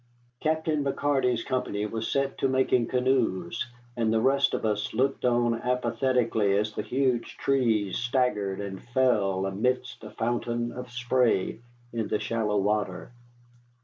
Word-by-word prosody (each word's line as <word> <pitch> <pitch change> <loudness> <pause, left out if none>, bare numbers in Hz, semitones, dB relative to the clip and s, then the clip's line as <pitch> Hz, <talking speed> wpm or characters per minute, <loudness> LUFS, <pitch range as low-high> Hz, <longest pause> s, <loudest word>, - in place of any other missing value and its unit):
Captain 155 -1 0
McCarty's 135 -4 +1
company 105 -5 -2
was 110 +1 -3
set 135 0 0
to - - +2
making 130 -2 +2
canoes, 120 -6 0 0.3
and 115 -2 +1
the 110 - +3
rest 140 +4 +3
of - - -3
us 105 -1 -1
looked 135 +1 +1
on 120 -1 +3
apathetically 120 -4 +1
as 105 +1 -1
the - - -2
huge 125 +2 -1
trees 115 -8 +1
staggered 120 -6 0
and 100 -2 -5
fell 105 -7 +1
amidst 125 +6 -1
a - - -7
fountain 120 0 -2
of 125 0 -7
spray 120 -4 +1 0.3
in 115 -2 -1
the - - 0
shallow 110 -2 -1
water. 100 0 -1
120 Hz, 140 wpm, -27 LUFS, 105-130 Hz, 0.3 s, the